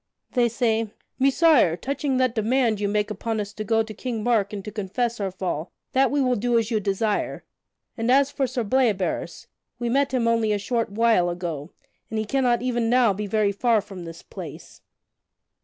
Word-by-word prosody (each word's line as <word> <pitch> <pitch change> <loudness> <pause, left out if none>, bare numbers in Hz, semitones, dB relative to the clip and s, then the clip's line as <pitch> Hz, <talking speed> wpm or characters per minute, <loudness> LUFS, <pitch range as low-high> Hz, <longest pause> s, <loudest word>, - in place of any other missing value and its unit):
They 240 -2 +2
say: 225 -2 0 0.3
"Messire, 275 - +4
touching 280 +2 -1
that 255 -2 +2
demand 230 -1 +1
you 205 - 0
make 210 +1 0
upon 220 +2 -3
us 205 0 -4
to 215 - -5
go 225 +1 +2
to 220 0 -8
King 225 0 -4
Mark 220 -4 +2
and 200 -2 -6
to 210 - -5
confess 225 +3 -2
our 195 -2 -1
fall, 180 -3 -4 0.2
that 265 0 +3
we 290 - 0
will 255 -2 +2
do 240 +2 +1
as 230 0 0
you 220 - +2
desire; 205 +1 -1 0.5
and 230 +1 -2
as 275 +2 +4
for 270 -2 0
Sir 245 0 -2
Bleoberis, 215 -5 0 0.3
we 240 -1 -2
met 275 +2 +2
him 245 -3 +1
only 230 -2 +2
a - - +1
short 230 +2 -1
while 215 -4 +3
ago, 170 -4 -4 0.4
and 220 - -3
he 215 - -1
cannot 245 0 +1
even 240 -2 0
now 240 -4 +4
be 205 +2 -4
very 210 0 +2
far 230 +2 +2
from 195 -3 -8
this 165 0 -9
place." - - -10
225 Hz, 195 wpm, -24 LUFS, 205-245 Hz, 0.5 s, Messire